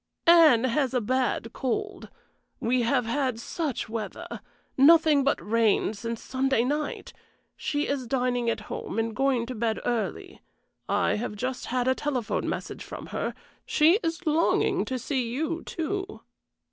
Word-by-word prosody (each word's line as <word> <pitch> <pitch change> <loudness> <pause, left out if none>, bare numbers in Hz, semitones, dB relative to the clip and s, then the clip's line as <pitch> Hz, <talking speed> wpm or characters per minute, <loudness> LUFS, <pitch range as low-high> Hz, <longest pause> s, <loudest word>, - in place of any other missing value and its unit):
"Anne 325 -9 +7
has 260 +1 +1
a - - +4
bad 245 0 -1
cold. 410 +10 -3 0.5
We 245 +2 +1
have 245 +1 +1
had 255 0 -1
such 290 +2 -3
weather 220 0 -6 0.3
nothing 305 0 +6
but 275 - +1
rain 220 -1 +2
since 230 +2 -5
Sunday 265 -2 +1
night! 295 +3 -3 0.4
She 290 0 -2
is 270 -3 -2
dining 245 -1 0
at 230 - -2
home 210 - -6
and 225 -1 -1
going 265 -3 +1
to 255 - -5
bed 225 -1 -1
early. 245 - -3 0.5
I - - +2
have 215 -1 -4
just 255 +4 -4
had 250 0 0
a 260 - +4
telephone 260 -4 -2
message - - -5
from - - -9
her; - - -2 0.3
she 320 +5 +4
is 330 0 -3
longing 315 +1 +2
to 260 - -3
see 255 -1 -2
you, 320 +7 -2
too." 385 +5 -4
260 Hz, 150 wpm, -27 LUFS, 230-300 Hz, 0.5 s, Anne